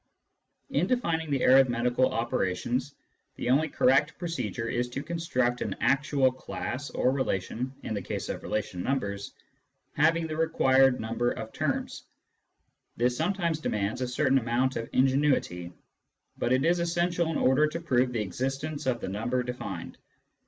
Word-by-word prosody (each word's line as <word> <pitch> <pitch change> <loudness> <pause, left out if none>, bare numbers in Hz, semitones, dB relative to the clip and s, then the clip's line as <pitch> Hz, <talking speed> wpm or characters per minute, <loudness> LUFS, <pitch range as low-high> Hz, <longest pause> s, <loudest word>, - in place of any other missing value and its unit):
In - - +1
defining 170 -11 0
the 140 -3 0
arithmetical 125 -1 +4
operations, 120 +4 -1 0.4
the 120 - -1
only 155 +4 +3
correct 140 +3 +3
pro 175 - -4
cedure 125 -8 -3
is 125 +1 -1
to 135 +3 -5
construct 135 -7 -1
an - - -2
actual 140 -1 +2
class 130 +2 -5
(or 130 - +1
relation, 125 -1 -2
in - - -3
the 100 - -2
case - - -4
of - - -4
relation 105 -4 -3
numbers) 100 -5 -2 0.6
having 165 +2 +3
the 155 -1 -4
required 135 -5 +3
number 115 +2 -1
of 110 -2 -6
terms. - - -2 1.0
This 125 +1 +2
sometimes 170 -1 0
demands 105 -5 -2
a 125 - 0
certain 135 +1 +2
amount 125 +2 0
of 115 - -4
ingenuity, 130 -10 +1 0.6
but 120 - -1
it 130 +3 +3
is 175 +1 +3
essential 170 0 0
in 165 - -1
order 130 +4 +4
to 160 +2 -4
prove 130 -6 +1
the 115 -3 -1
existence 135 - -3
of 120 -3 0
the - - -3
number 115 +6 -1
defined. 125 0 -6
130 Hz, 150 wpm, -28 LUFS, 120-155 Hz, 1.0 s, arithmetical